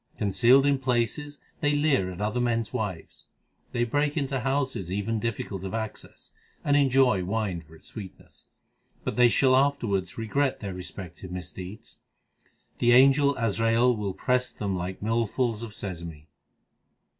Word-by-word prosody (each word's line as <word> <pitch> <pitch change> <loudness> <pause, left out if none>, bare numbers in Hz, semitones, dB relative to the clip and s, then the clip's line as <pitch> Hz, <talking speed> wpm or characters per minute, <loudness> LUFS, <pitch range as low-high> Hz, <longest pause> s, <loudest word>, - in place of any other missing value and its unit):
Concealed 120 +7 +4
in 140 -1 +3
places 130 +3 -1 0.2
they 150 -1 +2
leer 145 -11 +2
at 90 0 -8
other 105 +3 -1
men 120 -1 +1
s 110 - -9
wives. 95 -6 -5 0.4
They 120 -2 0
break 145 +5 0
into 135 -2 -1
houses 130 -8 -1
even 105 +3 -1
difficult 105 -4 -4
of 95 +3 -4
access, 110 -1 -6 0.3
and 145 - +2
enjoy 130 -8 +4
wine 100 -2 -2
for 80 0 -17
its - - -14
sweetness: 100 -5 -11 0.6
But - - -3
they 125 -1 +6
shall 130 +2 +4
afterwards 120 -9 +1
regret 130 +5 0
their 100 -3 -5
respective 90 0 -8
mis 90 0 -6
deeds. 95 +4 -10 0.8
The 120 0 +4
angel 140 +2 +6
Azrail 115 +2 +2
will 100 -3 -3
press 125 +5 +1
them 100 -2 -3
like 90 +1 -4
millfuls 115 +1 0
of 115 -2 -6
sesame. 85 -6 -7
115 Hz, 150 wpm, -27 LUFS, 95-130 Hz, 0.8 s, they